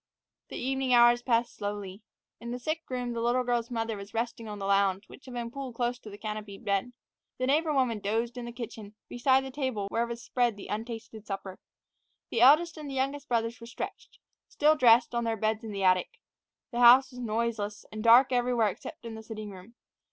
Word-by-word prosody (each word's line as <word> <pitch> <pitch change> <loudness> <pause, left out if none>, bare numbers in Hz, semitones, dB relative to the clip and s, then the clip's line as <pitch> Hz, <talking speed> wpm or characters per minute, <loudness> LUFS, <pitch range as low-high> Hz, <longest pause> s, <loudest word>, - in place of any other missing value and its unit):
The - - -7
evening 265 0 +1
hours 240 0 +6
passed 235 -1 +1
slowly. 205 -1 -5 0.4
In 235 - -7
the 245 - -3
sick 310 +6 -3
room 250 -2 -3
the 230 - -3
little 240 +2 +2
girl's 240 -1 -1
mother 225 -2 -2
was 200 +1 -10
resting 230 0 -3
on 210 -1 -6
the 195 - -5
lounge, 195 0 +2
which - - -15
had 255 -2 -9
been 235 -1 -4
pulled 265 -2 -6
close 245 0 -1
to 220 - -11
the 205 - -10
canopied 210 -2 -7
bed. 200 +5 0 0.4
The 255 - -1
neighbor 305 +4 +2
woman 255 -6 +1
dozed 225 +4 -1
in 245 -1 -6
the 235 - -6
kitchen, 220 -3 -8
beside 260 +2 +2
the 265 - -6
table 260 -7 -2
where 235 +3 0
was 235 +1 -6
spread 240 -5 0
the 200 - -10
untasted 220 0 -6
supper. 195 -1 -6 0.7
The 230 - 0
eldest 310 +6 +6
and 300 -2 -7
the 270 - -5
youngest 275 +2 -2
brothers 230 0 -1
were 230 - -9
stretched, 235 - -7 0.3
still 305 +1 +3
dressed, 240 -3 +5
on 235 0 0
their 225 -1 -1
beds 215 +2 -1
in 220 - -6
the 200 -1 -3
attic. 185 -1 +3 0.6
The 240 - -3
house 255 +2 +7
was 250 - -10
noiseless, 220 -3 -2
and 215 0 -6
dark 240 +3 +7
everywhere 245 -3 +2
except 200 - -9
in 230 - -6
the 220 - -8
sitting 215 -2 -7
room. 195 +5 -13
235 Hz, 210 wpm, -29 LUFS, 215-250 Hz, 0.7 s, house